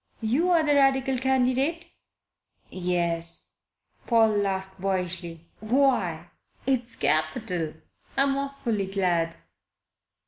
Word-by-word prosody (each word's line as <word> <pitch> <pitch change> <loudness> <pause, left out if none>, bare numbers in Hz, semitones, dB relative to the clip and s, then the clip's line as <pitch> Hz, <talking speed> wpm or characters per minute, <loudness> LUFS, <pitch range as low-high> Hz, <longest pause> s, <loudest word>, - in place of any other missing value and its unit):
You're 320 +9 +2
the 295 -1 +3
Radical 270 -2 +3
candidate?" 265 +5 +1 0.9
"Yes." 170 -2 -1 0.5
Paul 225 -2 +5
laughed 190 -2 -2
boyishly. 180 -3 -3
"Why, 215 - +1 0.3
it's 245 -3 -1
capital! 160 +1 -1 0.4
I'm 275 0 +3
awfully 270 -8 -2
glad." 175 -4 0
215 Hz, 80 wpm, -26 LUFS, 175-265 Hz, 0.9 s, Paul